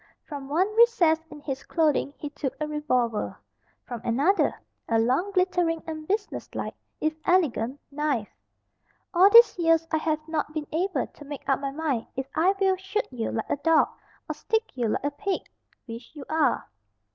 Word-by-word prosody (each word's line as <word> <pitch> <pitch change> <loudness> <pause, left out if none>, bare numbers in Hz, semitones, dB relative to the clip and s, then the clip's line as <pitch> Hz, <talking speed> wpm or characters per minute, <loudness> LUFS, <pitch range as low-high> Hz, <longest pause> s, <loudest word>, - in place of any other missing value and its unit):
From 280 -3 -8
one 345 +6 +2
recess 455 -10 +5
in 295 -1 -11
his 270 -2 -4
clothing 310 -4 +1
he 295 - -6
took 285 -2 -4
a 305 - -1
revolver. 255 -7 -1 0.5
From 240 -3 -6
another, 285 +13 +2 0.3
a 225 - +3
long, 255 - +2
glittering, 360 -3 +1
and 310 -1 -6
business 410 +1 -2
like, - - -3 0.3
if 310 +1 +1
elegant, 285 -7 +1
knife. 280 -7 -1 0.8
"All 375 +3 +7
these 465 -3 +8
years 330 -1 +3
I 320 - +3
have 310 0 -1
not 310 -1 -2
been 305 -1 -2
able 365 +5 0
to 295 - -15
make 285 -1 -8
up 270 - +2
my 275 0 -2
mind 275 -5 -2
if 265 0 -2
I 360 +6 +3
will 385 -1 +3
shoot 385 +3 -2
you 235 -3 -3
like 225 - -3
a - - +1
dog, 320 +2 +4 0.4
or - - -2
stick 445 - -2
you 240 -3 0
like 215 - -1
a 285 - 0
pig 390 +6 -2 0.4
which 230 +4 -9
you 285 -3 -8
are." 315 -1 +1
310 Hz, 180 wpm, -26 LUFS, 275-350 Hz, 0.8 s, these